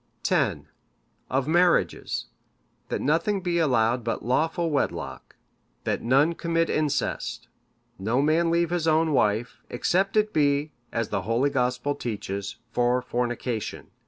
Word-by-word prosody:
(569) - - +1
"X. - - -33 0.6
Of 135 +1 0
marriages; 175 +2 +2 0.6
that - - -2
nothing 170 +7 +1
be 175 -1 0
allowed 120 -5 +2
but 115 -1 -3
lawful 160 +6 +1
wedlock; 145 - -3 0.5
that - - -1
none 135 +7 +3
commit 165 0 0
incest; 155 -2 -1 0.5
no 110 +6 0
man 160 +4 +3
leave 170 0 +1
his 175 -2 0
own 160 0 +3
wife, 110 -1 +1
except 190 - +1
it 215 0 +2
be, 145 0 +2 0.2
as 115 -2 -2
the 95 - -1
holy 115 +8 +1
Gospel 125 +1 0
teaches, 100 -6 -4 0.2
for 125 +1 +1
fornication. 120 -2 -3
140 Hz, 130 wpm, -26 LUFS, 120-165 Hz, 0.6 s, none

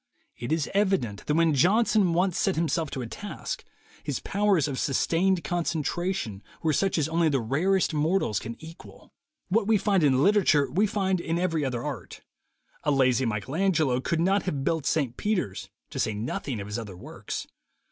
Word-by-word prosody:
It 120 +3 -6
is 160 -3 +1
evi 195 -1 +3
dent 105 -4 -7
that 150 - +1
when 165 -1 +3
Johnson 195 - +3
once 180 +1 +1
set 195 - +1
himself 160 -1 0
to 130 - -4
a - - -4
task, 205 - -6 0.4
his - - -2
powers 200 -7 +1
of 135 -3 -3
sustained 170 +5 +1
concentration 170 - -2 0.2
were 155 -1 +2
such 195 +4 +1
as 155 -2 +1
only 165 0 +2
the 140 -3 +1
rarest 165 +11 +1
mortals 155 - +1
can 115 +1 -6
equal. 165 +2 -13 0.4
What 205 +2 +2
we 220 -1 +4
find 195 -3 +2
in 135 -2 +4
literature, 185 -9 +3
we 200 +8 +2
find 190 -2 0
in 165 0 -1
every 165 -4 0
other 125 -3 -2
art. 140 -6 -6 0.6
A - - 0
lazy 130 -2 +3
Michael 110 +5 -3
Angelo 160 -9 +2
could 165 +5 -1
not 195 +4 +3
have 145 -7 -3
built 155 -2 0
St. 140 -6 0
Peters, 185 - -2 0.2
to - - -5
say 110 - 0
nothing 115 +2 -3
of 100 - -5
his 105 +3 -4
other 100 -5 -8
works. - - -6
160 Hz, 185 wpm, -27 LUFS, 130-190 Hz, 0.6 s, we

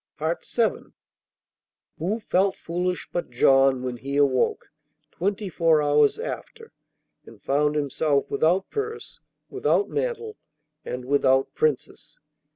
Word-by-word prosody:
VII 170 +8 -2 1.1
Who 195 +8 -1
felt 195 -2 +1
foolish 180 0 -3
but 175 - -3
John, 135 +1 +4
when 125 -1 -4
he 140 +3 -4
awoke, 135 -3 +1 0.4
twenty 200 +3 -2
four 165 -3 +2
hours 145 0 +3
after, 455 -1 -7 0.5
and - - -14
found 150 +2 +1
himself 145 0 0
without 180 +5 +1
purse, 445 +1 -5 0.3
without 405 0 +1
mantle, 455 -3 -3 0.5
and 125 -2 -6
without 135 -1 +2
Princess? 150 -4 -2
160 Hz, 110 wpm, -24 LUFS, 140-200 Hz, 1.1 s, John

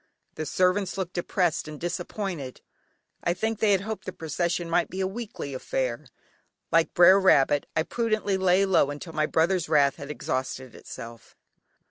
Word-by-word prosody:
The 155 - -5
servants 185 +3 +1
looked 185 -2 -3
depressed 175 -2 0
and 150 -1 -8
disappointed. 175 -5 -4 0.6
I 170 - +1
think 220 +2 -2
they 215 -1 +3
had 195 -2 +3
hoped 210 -1 -5
the - - -4
procession 170 +2 -2
might 170 0 +1
be 185 - -6
a 190 - +1
weekly 200 -8 -5
affair. 130 +1 -3 0.6
Like 165 0 +2
"Brer 180 +3 +8
Rabbit," 145 -6 +4
I 155 - +2
prudently 215 -1 -1
lay 190 +1 +3
low 185 -7 +3
until 145 +3 -7
my 155 0 +1
brother's 170 +1 +1
wrath 140 -3 +3
had 140 -2 -8
exhausted 130 -3 -4
itself. 115 -1 -11
175 Hz, 160 wpm, -26 LUFS, 150-190 Hz, 0.6 s, Brer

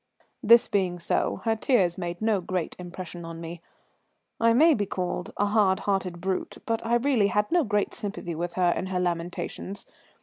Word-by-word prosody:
This 235 0 +6
being 185 -3 0
so, 170 - -1
her 225 -1 +2
tears 205 -7 +2
made 175 +2 -5
no 215 -4 +2
great 180 -1 -3
impression 175 -1 -7
on 165 0 -7
me. 165 0 -7 0.8
I 230 0 +4
may 310 +8 +6
be 205 -6 -1
called 180 +1 -3
a 205 - +2
hard 205 -2 +2
hearted 190 -3 -1
brute, 190 +1 -3
but 225 -1 -1
I 230 +1 +1
really 240 -4 +3
had 210 +1 0
no 345 -1 +4
great 210 -4 0
sympathy 200 -4 -5
with 170 +2 -4
her 180 -1 +2
in 185 - -2
her 185 -1 -1
lamentations. 175 +2 -3
190 Hz, 180 wpm, -26 LUFS, 175-220 Hz, 0.8 s, This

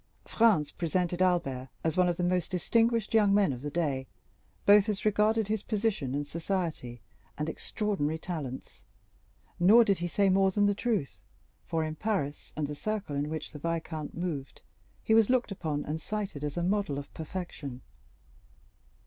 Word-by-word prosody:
Franz 210 -10 +3
presented 175 +1 -1
Albert 135 -9 +1
as 160 -1 0
one 180 -1 +4
of 175 - -1
the 180 - -1
most 180 -1 +1
distinguished 225 +4 +1
young 205 -3 +5
men 200 -8 +3
of 125 - -7
the 145 - -3
day, 145 -5 -1 0.6
both 205 0 +6
as 210 -1 -2
regarded 215 +1 +3
his 215 -1 -1
position 205 - -1
in 145 0 -1
society 160 - -3 0.4
and 150 - -2
extraordinary 160 -3 -2
talents; 155 -7 -6 0.8
nor 210 +7 +7
did 200 -5 +1
he 175 - -1
say 200 +3 +2
more 190 0 +4
than 205 +2 +2
the 205 - +3
truth, 210 - -2 0.5
for 160 -1 0
in 155 0 -3
Paris 155 -8 -2
and 155 - 0
the 145 - -4
circle 205 -1 -3
in 145 +1 -1
which 160 0 -5
the 150 - -9
viscount 160 -1 -4
moved, 155 -7 -4 0.4
he 220 - +2
was 225 0 +5
looked 250 -4 +2
upon 155 -6 -3
and 155 +2 -3
cited 200 -8 -4
as 150 +2 -3
a 175 - 0
model 195 -5 0
of 140 - -7
perfection. 155 -6 -6
175 Hz, 170 wpm, -29 LUFS, 150-205 Hz, 0.8 s, nor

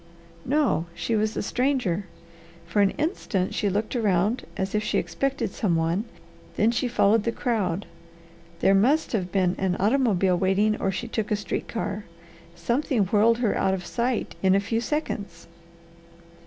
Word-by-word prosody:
"No. 265 - +1
She 220 +6 -1
was 215 0 0
a - - -1
stranger. 245 -7 0 0.6
For 170 +5 +1
an 200 - +5
instant 250 - -1
she 205 - 0
looked 210 +5 -2
around 210 +1 +1
as 190 0 -2
if 210 0 +1
she 215 - 0
expected 270 -6 -1
some 190 -5 0
one, 165 +6 0 0.5
then 220 +2 +3
she 240 +2 0
followed 225 -2 +3
the 230 - 0
crowd. 205 - -1 0.8
There 195 - +5
must 260 +11 +3
have 185 -6 -2
been 185 -2 +2
an 190 -2 +1
automobile 200 -5 +2
waiting 200 +3 +2
or 195 - +1
she 195 - -4
took 220 -2 -3
a 210 - +2
street 210 - -4
car. 210 -2 -4 0.5
Something 235 - 0
whirled 220 +4 +3
her 210 - +1
out 190 0 +1
of 180 -2 -7
sight 240 -1 -1
in 190 0 +4
a - - +4
few 225 +3 -1
seconds." 295 -7 -3
210 Hz, 165 wpm, -25 LUFS, 190-235 Hz, 0.8 s, an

